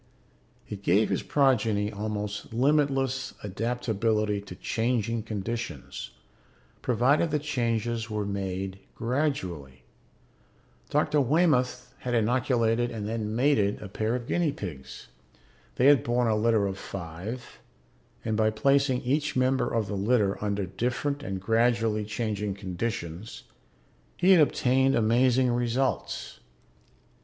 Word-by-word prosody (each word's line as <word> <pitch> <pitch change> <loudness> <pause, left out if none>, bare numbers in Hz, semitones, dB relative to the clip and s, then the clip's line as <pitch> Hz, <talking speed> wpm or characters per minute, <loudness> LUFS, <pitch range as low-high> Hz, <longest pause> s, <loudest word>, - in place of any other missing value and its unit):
It 100 -2 -7
gave 100 +3 +3
his - - 0
progeny 110 -7 +2
almost 105 -1 -4
limitless 135 +1 +1
adaptability 110 -1 -1
to 100 -3 -10
changing 115 +1 -1
conditions, 110 - -5 0.7
provided 130 +7 +2
the 150 - +1
changes 115 -5 -1
were 105 -1 -2
made 95 -1 -3 0.2
gradually. 100 - -2 1.1
Dr. 150 - +2
Waymoth 125 -4 +1
had 125 -1 -2
inoculated 120 0 +2
and 105 -3 -5
then 110 -1 -3
mated 115 -6 +2
a 105 - -7
pair 110 +4 -1
of 120 -2 -4
guinea 170 +3 +1
pigs; 80 - -8 0.7
they 125 - +2
had 140 -4 +6
borne 120 +1 +1
a 110 - +2
litter 110 -1 +2
of 95 0 -3
five 95 +7 -7 0.7
and 110 -1 0
by 110 0 +3
placing 135 +3 +2
each 145 +4 0
member 130 +1 +2
of 115 -2 0
the 100 - -5
litter 100 0 +1
under 100 -1 -1
different 125 +9 -2
and 95 -9 -4
gradually 115 +1 +1
changing 105 -2 -2
conditions, 95 -1 -5 0.7
he 180 +2 +4
had 180 -4 +7
obtained 135 -1 +3
amazing 125 +3 +3
results. 120 +2 -1
115 Hz, 120 wpm, -27 LUFS, 105-125 Hz, 1.1 s, had